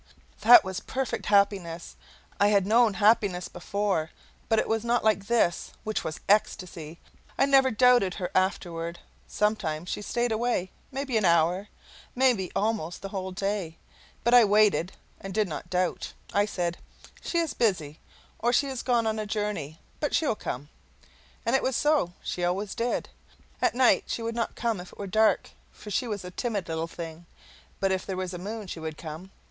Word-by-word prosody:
That 240 +3 +9
was 190 0 -4
perfect 265 +3 -3
happiness; 200 -5 +1 0.4
I 205 - +5
had 200 -2 +3
known 225 0 +4
happiness 205 -4 +3
before, 190 -3 -2 0.4
but 225 - +3
it - - +1
was 225 0 0
not 235 0 +1
like 210 -2 +2
this, 225 -7 +1
which 215 0 -2
was 155 - -5
ecstasy. 175 -5 0 0.4
I - - +4
never 270 -1 +5
doubted 245 -5 +4
her 180 -3 -4
afterward. 170 -3 -1 0.3
Sometimes 180 -6 -1
she - - -3
stayed 240 +3 -1
away 220 -5 0 0.2
maybe 270 -3 -1
an 215 - +1
hour, 170 +3 +3 0.5
maybe 245 -8 +2
almost 200 -6 -1
the 195 - -4
whole 190 -1 -4
day, 190 -3 -3 0.5
but 235 - +2
I 245 -1 +9
waited 205 -3 +3 0.3
and 195 0 -7
did 215 -2 +2
not 165 0 -6
doubt; 180 0 -1 0.2
I 205 0 +3
said, 175 -4 -2 0.4
"She 340 - -2
is 330 -2 0
busy, 165 -10 0 0.4
or 240 - +2
she 265 +3 +3
is 260 -2 -4
gone 240 -3 +1
on 220 0 0
a 215 - -3
journey, 205 -8 -3 0.2
but 295 - 0
she 320 - +2
will 280 - +2
come." 145 -8 -6 0.8
And 230 +3 +2
it 270 - +3
was 260 -1 0
so: 295 - +2
she 180 - -3
always 190 +3 -1
did. 235 +1 -1 0.5
At - - +2
night 255 0 +4
she 230 - -3
would 230 0 -2
not 230 -2 -2
come 230 -6 -1
if 180 - -12
it - - -17
was 200 -2 -6
dark, 220 +2 +3 0.2
for 210 - -11
she 245 +5 0
was 205 -4 -4
a 180 - -7
timid 205 -3 -3
little 160 0 -2
thing; 165 0 -8 0.5
but 195 -1 +1
if 190 0 0
there 190 -2 -4
was 185 -1 -3
a 175 - -5
moon 210 +3 -5
she 180 - -7
would 160 -1 -5
come. 160 +3 -8
200 Hz, 185 wpm, -27 LUFS, 180-230 Hz, 0.8 s, That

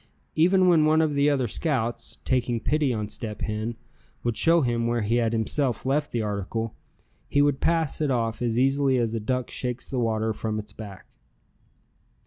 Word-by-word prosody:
Even 185 +3 +4
when 165 -3 +5
one 155 +1 +4
of 155 -2 +2
the 140 +1 +3
other 135 -4 +1
scouts, 120 -2 -2
taking 120 -2 +1
pity 150 +1 +1
on 105 -3 -2
Step 105 0 -6
Hen, 110 +2 -2 0.5
would 120 -2 0
show 165 +5 +4
him 120 -3 0
where 120 -1 0
he 115 +3 +1
had 115 -2 +1
himself 120 +3 0
left 145 +3 +1
the 115 -2 -1
article, 105 +2 -3 0.6
he 145 - +2
would 145 -1 +3
pass 165 -3 +1
it 150 - +1
off 115 -3 -1
as 120 -1 0
easily 135 0 +3
as 115 -2 0
a 115 - -1
duck 125 +3 -2
shakes 125 -1 -3
the 130 - -2
water 110 -1 0
from 110 0 -3
its 105 0 -7
back. 100 -4 -10
120 Hz, 185 wpm, -25 LUFS, 110-145 Hz, 0.6 s, when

